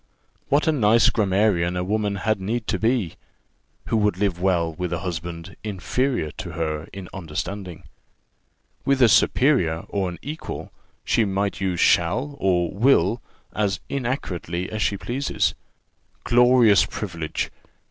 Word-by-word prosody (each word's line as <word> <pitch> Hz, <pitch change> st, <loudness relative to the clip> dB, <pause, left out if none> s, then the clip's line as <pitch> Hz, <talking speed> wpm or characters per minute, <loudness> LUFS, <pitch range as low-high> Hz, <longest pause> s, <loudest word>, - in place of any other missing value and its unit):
What 145 Hz, +2 st, +3 dB
a -, -, +5 dB
nice 115 Hz, -5 st, +4 dB
grammarian 95 Hz, -4 st, +1 dB
a 90 Hz, -, -1 dB
woman 105 Hz, +1 st, -1 dB
had 105 Hz, +1 st, -1 dB
need 110 Hz, +4 st, -2 dB
to 95 Hz, -, 0 dB
be, 110 Hz, -5 st, 0 dB, 0.7 s
who 115 Hz, -, 0 dB
would 105 Hz, -4 st, +1 dB
live 95 Hz, -3 st, -1 dB
well 85 Hz, -3 st, +1 dB
with 90 Hz, +1 st, -4 dB
a 85 Hz, -, -2 dB
husband 85 Hz, +1 st, -5 dB
inferior 110 Hz, -, -1 dB
to 85 Hz, -, -7 dB
her 80 Hz, -2 st, -2 dB
in 95 Hz, -2 st, -8 dB
understanding! 90 Hz, +1 st, -5 dB, 1.0 s
With 140 Hz, -1 st, +2 dB
a -, -, +8 dB
superior 105 Hz, -, +3 dB
or 95 Hz, -2 st, -1 dB
an 90 Hz, -, -7 dB
equal, 150 Hz, +3 st, -6 dB, 0.3 s
she 115 Hz, -, +3 dB
might 100 Hz, 0 st, -1 dB
use 90 Hz, -3 st, -1 dB
shall 120 Hz, -, +2 dB
and 90 Hz, 0 st, +1 dB
will 115 Hz, -4 st, +3 dB, 0.3 s
as 100 Hz, -4 st, 0 dB
inaccurately 95 Hz, -, -3 dB
as 110 Hz, 0 st, -3 dB
she 100 Hz, -, +1 dB
pleases. 130 Hz, +7 st, -1 dB, 0.7 s
Glorious 120 Hz, -3 st, +5 dB
privilege! 85 Hz, -6 st, -4 dB
100 Hz, 135 wpm, -23 LUFS, 90-115 Hz, 1.0 s, a